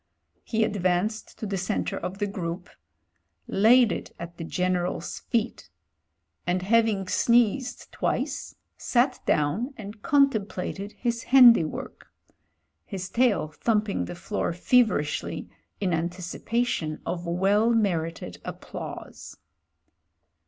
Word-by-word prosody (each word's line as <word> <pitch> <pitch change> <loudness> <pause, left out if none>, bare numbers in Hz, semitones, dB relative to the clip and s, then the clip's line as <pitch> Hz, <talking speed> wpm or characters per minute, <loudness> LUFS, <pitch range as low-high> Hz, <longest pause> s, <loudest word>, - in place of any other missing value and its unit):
He 225 -1 0
advanced 200 +1 -1
to - - -5
the 195 -2 -2
centre 195 +3 -2
of 185 - -5
the 205 - 0
group 180 -2 -5 0.4
— 85 0 -48 0.2
^laid 240 0 +7
it - - -5
at 170 0 -8
the 165 - -5
General's 180 +1 -2
feet 225 - -2 0.4
— 80 - -48
and 180 +1 0
hav 230 +3 +4
ing 195 -4 -2
sneezed 240 +4 +2
twice - - -2 0.2
sat 250 +1 +1
down 200 - +1
and 210 0 -9
contemplated 210 - 0
his 235 -1 -2
handi 240 -9 +8
work: 155 - -7 0.8
his 190 -2 -6
tail 230 -10 +2
thumping 210 +5 0
the 175 - -7
floor 175 0 -2
feverishly 180 - +1 0.3
in 190 -3 0
antici 175 +2 -3
pation 225 -10 -1
of 175 -1 -3
well 195 +6 +3
merited 165 - -1
applause. - - -8
195 Hz, 120 wpm, -26 LUFS, 175-230 Hz, 0.8 s, handi